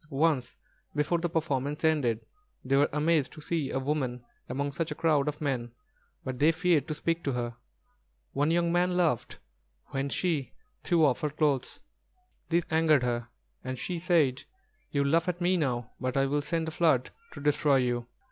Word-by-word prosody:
Once 140 Hz, -4 st, +1 dB, 0.4 s
before 150 Hz, +4 st, +1 dB
the 175 Hz, +1 st, -1 dB
performance 150 Hz, -3 st, -1 dB
ended, 130 Hz, -8 st, +1 dB, 0.4 s
they 135 Hz, +1 st, +2 dB
were 145 Hz, +1 st, +4 dB
amazed 150 Hz, -1 st, +2 dB
to -, -, -12 dB
see 155 Hz, -2 st, -2 dB
a -, -, -2 dB
woman 130 Hz, -3 st, -2 dB, 0.2 s
among 140 Hz, +3 st, -2 dB
such 165 Hz, +3 st, -2 dB
a 150 Hz, -, -4 dB
crowd 150 Hz, -3 st, +2 dB
of 150 Hz, 0 st, -2 dB
men; 130 Hz, -5 st, -2 dB, 0.5 s
but 130 Hz, -2 st, -5 dB
they 155 Hz, +3 st, +5 dB
feared 165 Hz, -3 st, +2 dB
to 155 Hz, -, -3 dB
speak 165 Hz, +2 st, -1 dB
to 140 Hz, -, -1 dB
her. 120 Hz, -1 st, -3 dB, 0.8 s
One 145 Hz, +2 st, +1 dB
young 170 Hz, 0 st, +2 dB
man 180 Hz, +1 st, +2 dB
laughed 160 Hz, -10 st, 0 dB, 0.5 s
when 135 Hz, 0 st, -2 dB
she 145 Hz, 0 st, -1 dB, 0.3 s
threw 170 Hz, -3 st, +4 dB
off 135 Hz, -4 st, +2 dB
her 150 Hz, -, 0 dB
clothes. 145 Hz, -3 st, 0 dB, 0.7 s
This 170 Hz, 0 st, +2 dB
angered 160 Hz, -4 st, +4 dB
her, 120 Hz, -1 st, -1 dB, 0.4 s
and 130 Hz, 0 st, -4 dB
she 175 Hz, +6 st, -3 dB
said: 160 Hz, -7 st, +2 dB, 0.5 s
"You 140 Hz, -1 st, +1 dB
laugh 165 Hz, +5 st, +2 dB
at 175 Hz, -1 st, -3 dB
me 180 Hz, +1 st, +2 dB
now; 125 Hz, -7 st, -1 dB
but 130 Hz, +1 st, -2 dB
I 135 Hz, -, +4 dB
will 145 Hz, +2 st, 0 dB
send 160 Hz, +2 st, -2 dB
a -, -, -3 dB
flood 155 Hz, -6 st, +2 dB, 0.2 s
to -, -, -8 dB
destroy 145 Hz, 0 st, +3 dB
you." 120 Hz, -2 st, 0 dB
145 Hz, 180 wpm, -29 LUFS, 130-165 Hz, 0.8 s, they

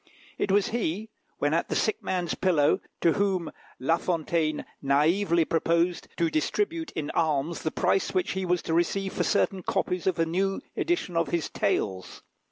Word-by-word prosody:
It -, -, +1 dB
was 200 Hz, 0 st, +3 dB
he, 215 Hz, -1 st, -2 dB, 0.3 s
when 145 Hz, +1 st, +1 dB
at 165 Hz, -, 0 dB
the -, -, -1 dB
sick 215 Hz, -, 0 dB
man's 180 Hz, -3 st, -1 dB
pillow, 160 Hz, -6 st, +3 dB, 0.2 s
to 165 Hz, -, +4 dB
whom 195 Hz, -4 st, 0 dB, 0.3 s
La 160 Hz, +6 st, +2 dB
Fontaine 165 Hz, -3 st, -1 dB, 0.2 s
naively 165 Hz, +5 st, +3 dB
proposed 170 Hz, +2 st, +1 dB
to 170 Hz, -, +2 dB
distribute 330 Hz, -, -1 dB
in 150 Hz, -2 st, -3 dB
alms 155 Hz, 0 st, 0 dB
the 160 Hz, -, -1 dB
price 180 Hz, +3 st, +1 dB
which 185 Hz, -, 0 dB
he 190 Hz, 0 st, -2 dB
was 180 Hz, -1 st, 0 dB
to 160 Hz, -, -2 dB
receive 190 Hz, +3 st, 0 dB
for -, -, 0 dB
certain 195 Hz, -2 st, +1 dB
copies 180 Hz, 0 st, -1 dB
of 185 Hz, -, +2 dB
a 165 Hz, -, +2 dB
new 190 Hz, +4 st, 0 dB, 0.2 s
edition 340 Hz, -, -1 dB
of 165 Hz, -, +2 dB
his 170 Hz, -3 st, -1 dB
"Tales." 95 Hz, -1 st, -2 dB
170 Hz, 175 wpm, -27 LUFS, 160-190 Hz, 0.3 s, to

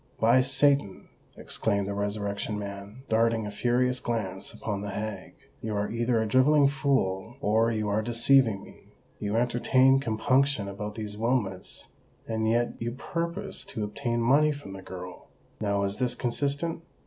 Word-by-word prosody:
"By 120 Hz, +3 st, +5 dB
Satan," 135 Hz, -5 st, +1 dB, 0.3 s
exclaimed 100 Hz, -2 st, -1 dB
the 100 Hz, -, -2 dB
Resurrection 100 Hz, +1 st, -2 dB
Man, 100 Hz, +4 st, -7 dB
darting 115 Hz, 0 st, +2 dB
a 105 Hz, -, -4 dB
furious 125 Hz, +3 st, +1 dB
glance 100 Hz, -6 st, -3 dB
upon 105 Hz, -3 st, -4 dB
the 105 Hz, -, -4 dB
hag, 100 Hz, -1 st, -5 dB, 0.3 s
"you 110 Hz, -1 st, -3 dB
are 105 Hz, 0 st, -1 dB
either 115 Hz, 0 st, +1 dB
a 110 Hz, -, +1 dB
drivelling 140 Hz, +5 st, +5 dB
fool, 120 Hz, -7 st, 0 dB
or 110 Hz, 0 st, +2 dB
you 110 Hz, -2 st, -1 dB
are 105 Hz, +1 st, +1 dB
deceiving 115 Hz, -1 st, +3 dB
me. -, -, -15 dB, 0.3 s
You 105 Hz, +1 st, -2 dB
entertain 130 Hz, +3 st, +4 dB
compunction 130 Hz, -1 st, +1 dB
about 105 Hz, +1 st, -5 dB
these 105 Hz, -2 st, -5 dB
Wilmots—and 110 Hz, 0 st, -3 dB
yet 120 Hz, +1 st, +1 dB
you 115 Hz, 0 st, -2 dB
purpose 170 Hz, +6 st, -4 dB
to 110 Hz, -, -4 dB
obtain 115 Hz, +3 st, -2 dB
money 145 Hz, +6 st, +4 dB
from 145 Hz, -9 st, -8 dB
the 95 Hz, -, -8 dB
girl. 90 Hz, -1 st, -9 dB, 0.3 s
Now 100 Hz, -2 st, 0 dB
is 100 Hz, +1 st, -2 dB
this 125 Hz, +1 st, 0 dB
consistent? 145 Hz, +7 st, -1 dB
115 Hz, 150 wpm, -28 LUFS, 105-130 Hz, 0.3 s, By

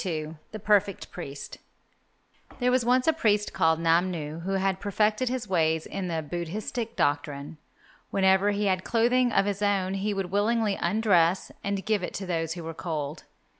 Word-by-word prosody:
XLII 160 Hz, -3 st, -4 dB
THE 215 Hz, -, -5 dB
PERFECT 205 Hz, -2 st, +1 dB
PRIEST 140 Hz, -5 st, -8 dB, 1.0 s
There 250 Hz, -1 st, +2 dB
was 255 Hz, -1 st, +3 dB
once 250 Hz, +3 st, +2 dB
a 320 Hz, -, +5 dB
priest 210 Hz, -8 st, +1 dB
called 160 Hz, 0 st, +2 dB
Namnu 165 Hz, -2 st, 0 dB
who 195 Hz, +3 st, -3 dB
had 190 Hz, -1 st, 0 dB
perfected 215 Hz, +5 st, +1 dB
his 250 Hz, -3 st, -3 dB
ways 160 Hz, -4 st, +1 dB
in 195 Hz, -2 st, -4 dB
the 165 Hz, -2 st, -2 dB
Buddhistic 210 Hz, -, -4 dB
doctrine. 145 Hz, -1 st, -1 dB, 0.5 s
Whenever 190 Hz, +1 st, +3 dB
he 205 Hz, 0 st, 0 dB
had 185 Hz, -1 st, +1 dB
clothing 245 Hz, +2 st, +2 dB
of 195 Hz, -, +3 dB
his 205 Hz, 0 st, -2 dB
own 195 Hz, -2 st, +1 dB
he 200 Hz, +1 st, -1 dB
would 190 Hz, -2 st, -3 dB
willingly 215 Hz, +1 st, +2 dB
undress 185 Hz, -2 st, +2 dB
and 200 Hz, -2 st, -2 dB
give 215 Hz, -2 st, +1 dB
it 180 Hz, -, -5 dB
to 190 Hz, -, -4 dB
those 165 Hz, -2 st, -1 dB
who 170 Hz, -1 st, -7 dB
were 165 Hz, 0 st, -5 dB
cold. 155 Hz, -3 st, -4 dB
195 Hz, 170 wpm, -27 LUFS, 165-210 Hz, 1.0 s, a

